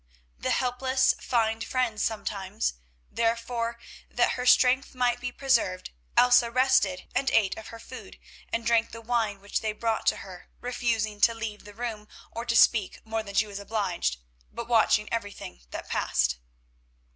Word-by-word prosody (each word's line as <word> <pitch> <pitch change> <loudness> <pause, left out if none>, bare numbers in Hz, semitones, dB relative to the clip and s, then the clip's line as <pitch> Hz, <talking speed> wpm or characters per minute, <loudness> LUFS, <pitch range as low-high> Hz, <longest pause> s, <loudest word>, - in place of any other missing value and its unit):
The - - -2
helpless 260 +1 +2
find 225 -2 0
friends 235 -3 -1
sometimes. 205 - -2 0.4
Therefore, 230 0 -1 0.3
that - - +2
her 250 0 -3
strength 260 +2 +4
might 245 -1 +1
be 245 0 -4
preserved, 235 - 0 0.3
Elsa 245 -1 +6
rested 255 -7 +2
and 265 +1 +1
ate 205 -4 +2
of 220 - -9
her 230 - -9
food, 255 +3 -11 0.3
and 230 - -2
drank 230 0 +2
the 230 - -8
wine 225 -3 -1
which 200 - -2
they 215 -1 -1
brought 225 0 -2
to - - +3
her, 180 -2 -12
refusing 230 -4 -1
to 230 +1 +5
leave 220 -2 -6
the 205 -1 -12
room, 220 -2 -5 0.2
or 230 +1 -5
to 235 -1 0
speak 220 -4 +4
more 220 0 -2
than 200 -2 -9
she 215 - +4
was 200 -1 -7
obliged, 200 - -1 0.3
but 235 0 -6
watching 220 -2 +3
everything 205 - -5
that - - -7
passed. 60 -1 0
230 Hz, 160 wpm, -27 LUFS, 210-245 Hz, 0.4 s, Elsa